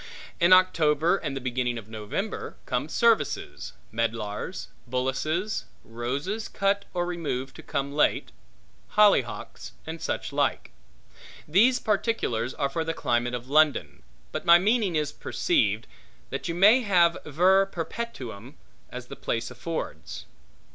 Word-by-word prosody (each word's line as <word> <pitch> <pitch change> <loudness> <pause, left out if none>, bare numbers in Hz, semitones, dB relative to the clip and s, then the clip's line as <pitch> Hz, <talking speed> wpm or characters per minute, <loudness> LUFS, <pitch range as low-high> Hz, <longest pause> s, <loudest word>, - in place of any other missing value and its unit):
In 170 0 +4
October 170 -2 +4
and 140 -6 -4
the - - -2
beginning 125 -1 -1
of 110 -2 -8
November 110 - -5
come - - -2
services; 230 -2 +1 0.2
medlars; 115 - -3 0.2
bullaces; 155 - -1 0.2
roses 140 - -3
cut 200 0 0
or 175 -1 -1
removed 150 -7 -4
to - - -9
come 140 +1 -3
late; 150 - +1 0.6
hollyhocks; 130 - +2
and 160 +1 -6
such - - -3
like. - - 0 0.8
These 225 +11 +4
particulars 195 - -1
are 140 - 0
for 160 +4 -2
the 165 0 -3
climate 120 +1 0
of 125 +1 -7
London; 150 +1 +2 0.3
but - - -4
my 170 0 +8
meaning 205 -1 +1
is 150 -1 0
perceived, 105 -4 0 0.5
that - - -4
you 170 - -2
may 210 +8 +6
have 175 -6 +4
ver 185 +6 +3
perpetuum, 150 - -6 0.3
as 125 0 -7
the - - -9
place 115 +2 -3
affords. 125 - -6
155 Hz, 130 wpm, -26 LUFS, 125-190 Hz, 0.8 s, my